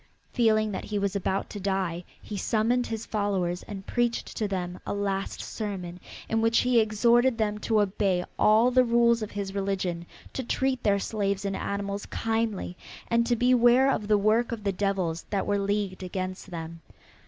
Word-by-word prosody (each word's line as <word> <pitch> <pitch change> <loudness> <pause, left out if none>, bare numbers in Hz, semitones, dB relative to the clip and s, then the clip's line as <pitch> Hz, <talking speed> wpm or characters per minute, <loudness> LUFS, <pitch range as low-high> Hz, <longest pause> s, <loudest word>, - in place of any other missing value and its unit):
Feeling 215 -3 +3
that 190 - -4
he 210 - -3
was 200 -1 -1
about 195 0 -1
to 205 - -6
die 190 -3 -1 0.2
he 210 - -7
summoned 230 +4 +1
his 225 -1 -4
followers 190 -4 -1
and 195 -2 -8
preached 240 -1 -1
to 215 - -1
them 180 -2 -3
a - - -3
last 195 -1 -2
sermon 185 -5 -5 0.3
in 225 0 +1
which 225 0 +3
he 250 -1 +4
exhorted 235 +3 +3
them 210 -2 0
to 220 0 +1
obey 190 -2 0
all 220 +4 +5
the 255 0 +5
rules 235 -1 +3
of 215 - -3
his 200 -1 -4
religion, 190 -4 -2 0.3
to 260 - -3
treat 260 +1 0
their 200 -1 +3
slaves 200 -1 -1
and 195 -1 -1
animals 200 +1 -3
kindly 225 -5 -2 0.3
and 235 0 +2
to 240 - +3
beware 245 +2 +5
of 210 - -2
the 210 -1 +4
works 220 +4 +2
of 220 -3 -6
the 200 - +1
devils 185 -4 -1
that 200 -2 -1
were 205 0 +1
leagued 200 -1 -1
against 185 +1 -5
them. 165 -1 -7
205 Hz, 180 wpm, -27 LUFS, 195-230 Hz, 0.3 s, all